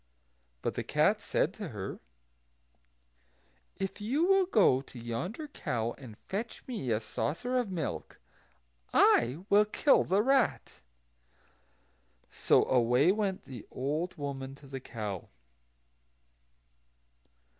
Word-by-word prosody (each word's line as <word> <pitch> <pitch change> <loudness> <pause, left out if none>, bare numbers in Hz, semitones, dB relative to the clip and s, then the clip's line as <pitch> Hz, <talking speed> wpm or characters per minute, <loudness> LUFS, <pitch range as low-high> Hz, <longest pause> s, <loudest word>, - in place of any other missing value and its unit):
But - - -1
the - - -3
cat - - +2
said - - 0
to - - -6
her, - - -6 1.8
"If 195 +2 -4
you 270 +11 +1
will 385 0 +4
go 190 - +4
to 135 - -14
yonder 145 - -4
cow, 120 - -2
and 115 -6 -12
fetch 220 +5 -5
me 225 - -4
a 110 -2 +2
saucer 165 - -3
of 240 -5 -2
milk, 175 -5 -4 0.7
I 130 +10 +4
will 210 0 +5
kill 275 +7 +3
the 195 +3 +2
rat." 265 -1 +1 1.5
So - - +3
away 125 +6 +4
went 200 -2 -1
the 130 -5 -9
old 150 +7 -2
woman 135 -2 -5
to 140 - -17
the 135 0 -6
cow. 105 -7 -6
155 Hz, 115 wpm, -31 LUFS, -, 1.8 s, will